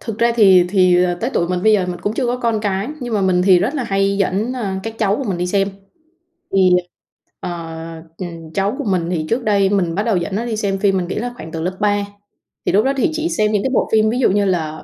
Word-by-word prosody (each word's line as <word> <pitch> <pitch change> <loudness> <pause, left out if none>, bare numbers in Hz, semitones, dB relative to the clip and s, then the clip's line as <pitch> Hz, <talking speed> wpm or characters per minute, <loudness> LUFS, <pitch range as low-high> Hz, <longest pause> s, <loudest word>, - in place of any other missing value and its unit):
thực 225 -2 -6
ra 235 0 +3
thì 190 -5 +6
thì, 180 -2 +4
ờ, 175 -1 0
tới 240 - -1
tuổi 170 - +1
mình 180 0 -2
bây 220 - +5
giờ 195 -4 +2
mình 175 -1 -5
cũng 205 +4 -2
chưa 255 - -1
có 245 +1 0
con 230 -3 -1
cái, 200 +1 -2
nhưng 240 -3 -3
mà 205 - +1
mình 185 -2 +2
thì 185 -2 +6
rất 255 - -1
là 265 - -2
hay 195 -1 0
dẫn, 200 +4 0
à, 200 -7 -3
các 225 +2 -5
cháu 205 -1 +1
của 275 - -4
mình 190 -5 -2
đi 180 - -1
xem. 195 +1 +1 0.8
Thì, 190 -1 +4 0.7
ờ, - - -5 1.0
cháu 200 +4 0
của 290 - -3
mình 185 -7 -1
thì 165 -3 -2
trước 240 +2 0
đây 200 -3 +2
mình 180 -5 0
bắt 205 - 0
đầu 220 -4 +1
dẫn 175 +2 -3
nó 230 +3 -2
đi 225 -2 -3
xem 200 -2 -1
phim, 195 -1 +2
mình 180 -2 -2
nghĩ - - -4
là 245 +3 -3
khoảng 160 - -9
từ 160 0 -4
lớp 185 +2 -3
3. 205 -1 +1 0.6
Thì - - +1
lúc 210 +4 +3
đó 270 - +2
thì 265 - +2
chỉ 320 +1 -1
xem 215 -7 +1
những 205 -2 0
cái - - 0
bộ - - +1
phim 220 0 +3
ví 240 +3 -1
dụ 260 - +3
như 205 +1 +2
là 160 -5 -2
200 Hz, 275 wpm, -18 LUFS, 185-225 Hz, 1.0 s, thì